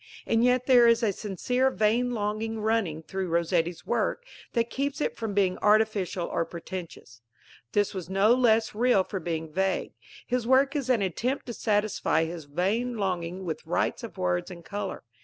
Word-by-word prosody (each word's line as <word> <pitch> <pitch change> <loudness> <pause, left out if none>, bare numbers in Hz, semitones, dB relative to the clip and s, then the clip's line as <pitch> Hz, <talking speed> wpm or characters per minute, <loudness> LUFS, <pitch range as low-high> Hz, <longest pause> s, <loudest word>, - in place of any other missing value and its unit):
And 225 0 +2
yet 250 0 +3
there 245 -3 +6
is 230 +1 +4
a 210 -3 +2
sincere 245 +7 0
vain 235 +1 +1
longing 215 +1 -2
running 210 -8 0
through 190 +2 -4
Rossetti's 170 0 0
work - - -1 0.3
that 235 -1 0
keeps 280 +2 -2
it - - -1
from 220 -3 -4
being 190 -2 +2
artificial 210 -4 +2
or - - -1
pretentious. 165 -8 -8 0.5
This 205 -1 +1
was 185 -3 -6
no 195 +4 +4
less 225 -3 +3
real 225 -3 +3
for 195 - -5
being 160 -2 -4
vague. 190 +1 -1 0.3
His 245 -2 -1
work 270 +3 +4
is 275 -3 -2
an 235 -5 +3
attempt 240 - -2
to 240 - -5
satisfy 205 -7 +1
his 165 -2 -7
vain 205 +11 -1
longing 185 -2 -2
with 160 -3 -4
rites - - -1
of - - -8
words 90 0 -1
and 170 -2 -10
colour. 205 -1 -5
205 Hz, 175 wpm, -27 LUFS, 175-235 Hz, 0.5 s, there